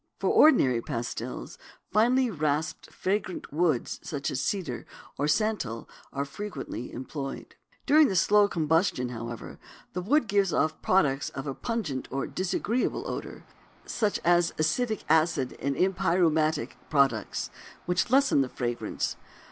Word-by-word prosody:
For - - +1
ordinary 130 - +5
pastils 115 +1 -5 0.3
finely 245 +3 +3
rasped 155 -2 -2
fragrant 190 -5 -3
woods 155 -6 0
such 145 -4 -3
as 135 - -2
cedar 195 -4 -3 0.3
or 145 - +1
santal 150 - 0 0.2
are 140 0 -2
frequently 140 - -6
employed. 135 +2 -6 0.3
During 305 0 +6
the 190 - -2
slow 205 +3 +5
combustion, 160 -6 +1
however, 115 -1 -7 0.3
the 180 - -2
wood 250 +8 +2
gives 200 -2 +2
off 155 0 0
products 145 -7 +2
of 135 - -6
a 140 - -3
pungent 185 - -3
or 135 +1 -2
disagreeable 205 +6 -1
odor - - -6 0.4
such 210 -3 0
as 175 0 +3
acetic 215 +8 0
acid 155 -4 +2
and 140 +1 -1
empyreumatic 170 -3 +2 0.2
products, 140 -3 +1 0.3
which 180 +5 +1
lessen 265 - +4
the 130 - -1
fragrance. 120 -1 -3
160 Hz, 130 wpm, -28 LUFS, 135-200 Hz, 0.4 s, During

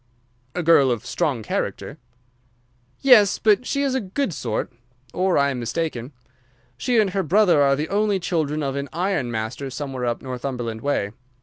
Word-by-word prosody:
"A 180 - -1
girl 155 -5 +5
of 120 -1 -2
strong 130 -1 -1
character." - - -4 1.0
"Yes, 230 -7 +6
but 220 +3 +2
she 280 0 0
is 275 -2 0
a 265 - 0
good 200 +2 -2
sort, 130 - -3 0.4
or 185 0 +1
I 140 0 +3
am 130 - -4
mistaken. 125 +1 -3 0.6
She 240 - 0
and 210 -4 +3
her 195 +1 0
brother 180 -2 +4
are 140 -1 +4
the 150 +3 -3
only 205 -1 +1
children 155 -4 -1
of 135 -1 -2
an 140 0 -4
iron 175 -6 -1
master 120 +4 -4
somewhere 130 -1 -4
up 120 - -2
Northumberland 125 -3 -4
way. 120 -8 -1
145 Hz, 170 wpm, -23 LUFS, 130-195 Hz, 1.0 s, Yes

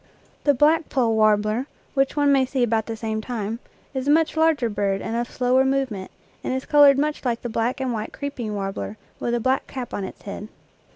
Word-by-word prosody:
The 285 -1 +5
black 305 +4 +3
poll 240 -4 +2
warbler, 215 +3 +2 0.3
which 270 0 +1
one 290 -1 +3
may 270 -1 +4
see 260 -1 0
about 225 -2 +1
the 225 -1 -4
same 220 0 -2
time, 225 -1 -4 0.3
is 265 0 -3
a - - +3
much 320 +2 +3
larger 315 -6 +3
bird 200 -2 -1
and 225 - -4
of 240 +1 -1
slower 255 +1 +2
movement, 265 -8 -1 0.3
and 255 - -1
is 260 - -3
colored 290 -2 +6
much 300 +1 -1
like 240 -3 -1
the 240 - -3
black 230 +4 -1
and 260 -2 -1
white 215 -1 -4
creeping 255 -7 -4
warbler 195 +1 -4 0.2
with 240 - -1
a - - 0
black 260 +3 0
cap 255 -2 -6
on 200 - -2
its 190 - -8
head. 205 +1 -6
245 Hz, 215 wpm, -23 LUFS, 220-275 Hz, 0.3 s, colored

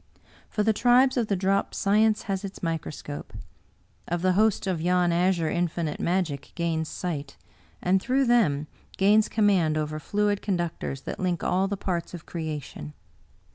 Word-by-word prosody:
For 210 - 0
the 220 +1 +3
tribes 250 +4 +4
of 240 -4 +1
the 200 - +1
drop 195 +1 0
science 215 +2 +3
has 195 -1 -3
its 195 -1 -8
mi 165 -1 0
croscope. 145 -1 -8 0.7
Of 175 +1 -2
the 185 - +4
host 215 +2 +2
of 185 -4 -1
yon 180 0 +2
azure 170 -2 +2
Infinite 170 -3 -1
magic 170 -6 -1
gains 165 -2 -1
sight, 145 -6 -5 0.5
and 185 +1 +3
through 265 +4 +2
them 195 - +3 0.3
gains 210 +2 +4
command 190 -8 +2
over 155 0 -2
fluid 205 +4 0
con 195 -3 0
ductors 165 -5 -4
that - - -6
link 180 -3 -1
all 190 +2 +1
the 200 0 -3
parts 180 -2 -3
of 170 - -10
creation. 150 - -6
180 Hz, 165 wpm, -26 LUFS, 165-205 Hz, 0.7 s, tribes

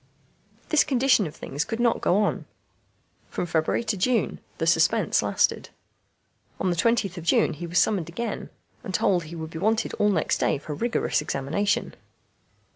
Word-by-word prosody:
This 310 - +5
condition 255 - +3
of 150 - -10
things 145 +3 -3
could 225 - -5
not 240 -1 +2
go 180 - +2
on. - - -1 0.8
From - - -3
February 160 +5 0
to 220 -2 -1
June 230 +5 0 0.2
the - - -1
suspense - - +3
lasted. - - 0 0.9
On 185 - +1
the - - 0
20th 200 -1 +1
of - - -9
June 170 - +3
he 170 +3 -6
was 175 +2 -2
summoned 175 -3 +2
again, 225 +6 -4 0.3
and 190 - -4
told 180 -4 +2
he 165 +2 -9
would 160 -1 -6
be 160 - -6
wanted 220 +4 0
all 210 - +4
next 170 -6 +1
day - - +1
for 150 - -9
a - - -3
rigorous 230 -4 0
examination. 155 +9 -1
185 Hz, 175 wpm, -25 LUFS, 160-225 Hz, 0.9 s, This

